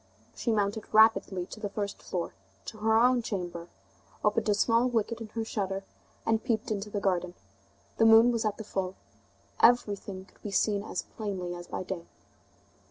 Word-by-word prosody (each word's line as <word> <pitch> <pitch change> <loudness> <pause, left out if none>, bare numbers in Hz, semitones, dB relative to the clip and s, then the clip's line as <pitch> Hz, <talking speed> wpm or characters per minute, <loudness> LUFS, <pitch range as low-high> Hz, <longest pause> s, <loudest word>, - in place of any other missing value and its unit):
She 235 - -1
mounted 210 0 -1
rapidly 215 -4 +4
to - - -8
the 210 -2 -3
first 200 0 -4
floor, 175 -2 -4 0.3
to 215 - -8
her 220 +1 +3
own 245 +1 +4
chamber, 175 -6 -4 0.6
opened 210 +1 +2
a 205 - +4
small 230 +3 +3
wicket 230 -1 -1
in 225 - -5
her 225 -1 -1
shutter, 195 -3 -2 0.4
and 225 0 +1
peeped 220 -2 -1
into 210 0 -2
the 205 - -2
garden. 180 -3 0 0.6
The 225 - +4
moon 225 +2 +8
was 230 -2 0
at 215 -2 -1
the 220 - -6
full. 190 -2 -3 0.6
Everything 205 -5 +2
could - - -26
be 210 - -5
seen 200 0 +1
as 210 - -4
plainly 190 -5 -5
as 175 0 -8
by - - -4
day. 180 -2 -6
210 Hz, 175 wpm, -29 LUFS, 190-225 Hz, 0.6 s, moon